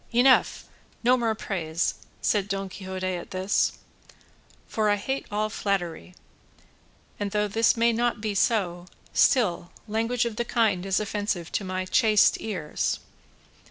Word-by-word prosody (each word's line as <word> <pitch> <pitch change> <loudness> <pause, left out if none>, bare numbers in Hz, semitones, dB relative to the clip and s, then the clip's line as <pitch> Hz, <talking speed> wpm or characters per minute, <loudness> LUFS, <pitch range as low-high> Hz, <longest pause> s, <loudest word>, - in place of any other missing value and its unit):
"Enough; 250 +2 +4 0.4
no 250 +2 +5
more 230 -3 0
praise," 170 -5 -2 0.3
said 205 -2 +1
Don 195 -1 -3
Quixote 190 0 -6
at 185 -2 -3
this, 190 +2 +1 0.9
"for 215 -1 0
I 205 - +4
hate 265 +7 -3
all 210 +1 0
flattery; 185 -4 -3 1.0
and 205 -1 -1
though 210 +1 0
this 225 +3 +2
may 235 0 +3
not 240 0 0
be 210 -1 -2
so, 185 -5 0 0.3
still 180 -9 +2 0.2
language 230 +3 0
of 225 -2 -4
the 240 - +1
kind 215 -6 +1
is 195 - +2
offensive 205 -4 -2
to - - -1
my 185 0 -3
chaste 215 +2 +4
ears. 180 -9 -2
205 Hz, 140 wpm, -26 LUFS, 185-225 Hz, 1.0 s, no